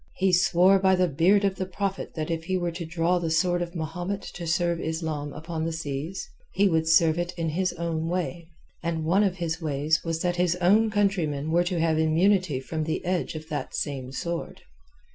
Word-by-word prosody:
He 190 -1 +1
swore 180 +2 +5
by 190 0 +4
the 185 0 +2
beard 180 +7 +3
of 195 -1 0
the 185 - -3
Prophet 195 +1 -4
that 155 0 -3
if 165 0 -3
he 185 +1 0
were 175 -1 -1
to 170 -1 -6
draw 170 +2 +1
the 165 -2 -2
sword 175 +2 +2
of 175 +1 -4
Mahomet 175 +5 -4
and - - -9
to 175 -1 -6
serve 170 0 +1
Islam 160 -3 -3
upon 160 +1 -5
the 165 - -1
seas, 160 - -4 0.3
he 200 - +4
would 160 -3 +1
serve 160 0 +4
it 175 +1 -2
in 165 -1 -1
his 185 +4 0
own 165 -1 -2
way, 175 -2 -3 0.3
and 165 -2 -2
one 190 +6 +3
of 190 -3 +1
his 170 -1 -3
ways 150 +1 0
was 165 -1 -2
that 175 -1 0
his 175 -1 +2
own 200 +5 +4
countrymen 175 -8 0
were 175 +1 +4
to 175 -1 -1
have 160 -1 +2
immunity 165 -1 +2
from 155 +4 -4
the 160 +3 -3
edge 180 -2 -1
of 155 0 -7
that 150 - -4
same 135 -3 -3
sword. 170 +4 -5
170 Hz, 215 wpm, -26 LUFS, 160-180 Hz, 0.3 s, swore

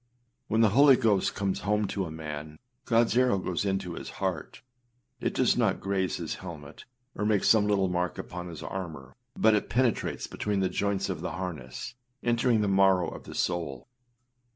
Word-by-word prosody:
When 110 +1 +2
the 110 - +6
Holy 135 +5 +7
Ghost 110 -6 +1
comes 95 -2 -1
home 105 +1 +1
to 95 -2 -2
a - - -8
man, 75 -1 -7 0.3
Godâs 115 -1 +3
arrow 125 -4 +4
goes 90 +1 -2
into 95 -3 -1
his - - -7
heart: - - -3 0.6
it - - -2
does - - +3
not - - +1
graze 95 -1 -1
his 85 -3 -4
helmet, 80 -5 -9 0.3
or - - -4
make 105 -2 +2
some 105 -2 +5
little 100 -2 +2
mark 90 -1 -1
upon 90 0 -6
his 85 -3 -8
armour, 80 -9 -6 0.2
but 110 0 +5
it 105 - 0
penetrates 125 -1 0
between 105 -1 -2
the 95 -1 +1
joints 100 +1 -1
of 90 -5 -4
the 90 - -4
harness, 85 -8 -6 0.3
entering 120 -1 +2
the 105 - +1
marrow 95 -2 +4
of - - -10
the - - -9
soul. 85 -8 -2
95 Hz, 180 wpm, -28 LUFS, 85-105 Hz, 0.6 s, Holy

